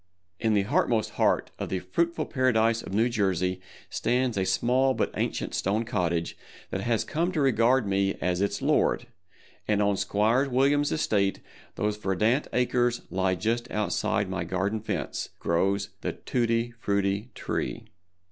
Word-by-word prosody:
In 110 Hz, -2 st, +2 dB
the 100 Hz, -, +3 dB
heartmost 110 Hz, +2 st, +1 dB
heart -, -, +1 dB
of -, -, -3 dB
the 95 Hz, -, -1 dB
fruitful 170 Hz, -, -1 dB
Paradise 115 Hz, -4 st, +2 dB
of -, -, -9 dB
New 110 Hz, +4 st, +3 dB
Jersey 95 Hz, -5 st, 0 dB, 0.3 s
stands 125 Hz, 0 st, 0 dB
a 95 Hz, -1 st, 0 dB
small 125 Hz, +7 st, +2 dB
but -, -, -1 dB
ancient -, -, -2 dB
stone 105 Hz, +4 st, 0 dB
cottage 85 Hz, -7 st, -1 dB, 0.4 s
that 95 Hz, -, -2 dB
has 115 Hz, +1 st, +1 dB
come 170 Hz, +4 st, -1 dB
to 160 Hz, -, -1 dB
regard 130 Hz, -2 st, +3 dB
me 100 Hz, 0 st, +1 dB
as 90 Hz, 0 st, 0 dB
its 100 Hz, -, -1 dB
lord, -, -, +2 dB, 0.6 s
and 105 Hz, -1 st, +2 dB
on 100 Hz, -1 st, +2 dB
Squire 115 Hz, +9 st, +2 dB
Williams' 140 Hz, +3 st, +2 dB
estate, 100 Hz, -10 st, +1 dB, 0.4 s
whose 105 Hz, 0 st, 0 dB
verdant 105 Hz, +7 st, +1 dB
acres 125 Hz, -1 st, +1 dB
lie 95 Hz, 0 st, +1 dB
just 115 Hz, +5 st, -1 dB
outside 105 Hz, -1 st, 0 dB
my 95 Hz, -1 st, -3 dB
garden 95 Hz, +5 st, -1 dB
fence, 110 Hz, -, -3 dB
grows 100 Hz, +4 st, 0 dB
the -, -, -2 dB
Tutti 120 Hz, -1 st, -1 dB
Frutti 100 Hz, +2 st, 0 dB
Tree. -, -, -3 dB
105 Hz, 150 wpm, -27 LUFS, 95-120 Hz, 0.6 s, the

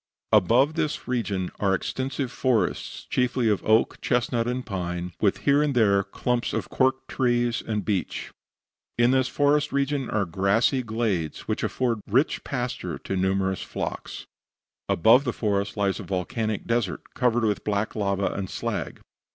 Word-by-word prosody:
Above 115 Hz, -, +4 dB
this 155 Hz, -2 st, -2 dB
region 105 Hz, -7 st, -1 dB
are 100 Hz, -1 st, +2 dB
extensive 130 Hz, +6 st, -3 dB
forests, 115 Hz, -11 st, -1 dB
chiefly 125 Hz, -1 st, +1 dB
of 105 Hz, -3 st, +1 dB
oak, 110 Hz, +1 st, +2 dB
chestnut, 120 Hz, -1 st, 0 dB
and 125 Hz, +1 st, -2 dB
pine, 90 Hz, -3 st, -4 dB
with 100 Hz, -3 st, +3 dB
here 140 Hz, +1 st, +5 dB
and 145 Hz, -3 st, 0 dB
there 100 Hz, -4 st, +4 dB
clumps 120 Hz, +5 st, -2 dB
of -, -, -2 dB
cork 130 Hz, 0 st, +1 dB
trees 120 Hz, -2 st, +1 dB
and 105 Hz, -2 st, -3 dB
beech. 100 Hz, -4 st, -2 dB, 0.7 s
In 120 Hz, +1 st, +4 dB
this 130 Hz, -1 st, +3 dB
forest 145 Hz, +2 st, +2 dB
region 140 Hz, -1 st, 0 dB
are 105 Hz, -2 st, +1 dB
grassy 100 Hz, -, +2 dB
glades, 110 Hz, -9 st, -2 dB
which -, -, -3 dB
afford 120 Hz, -4 st, 0 dB
rich 130 Hz, +9 st, +1 dB
pasture 120 Hz, -, -3 dB
to 95 Hz, -, -4 dB
numerous 95 Hz, 0 st, 0 dB
flocks. -, -, -5 dB, 0.6 s
Above 115 Hz, +9 st, +5 dB
the 125 Hz, -, -1 dB
forest 100 Hz, -1 st, -1 dB
lies 100 Hz, -2 st, +1 dB
a -, -, -5 dB
volcanic 105 Hz, +3 st, -2 dB
desert, 115 Hz, -6 st, -2 dB
covered 120 Hz, -1 st, +1 dB
with 105 Hz, -3 st, 0 dB
black 105 Hz, 0 st, -1 dB
lava 100 Hz, -2 st, 0 dB
and 95 Hz, -2 st, -4 dB
slag. -, -, -4 dB
115 Hz, 150 wpm, -25 LUFS, 100-125 Hz, 0.7 s, here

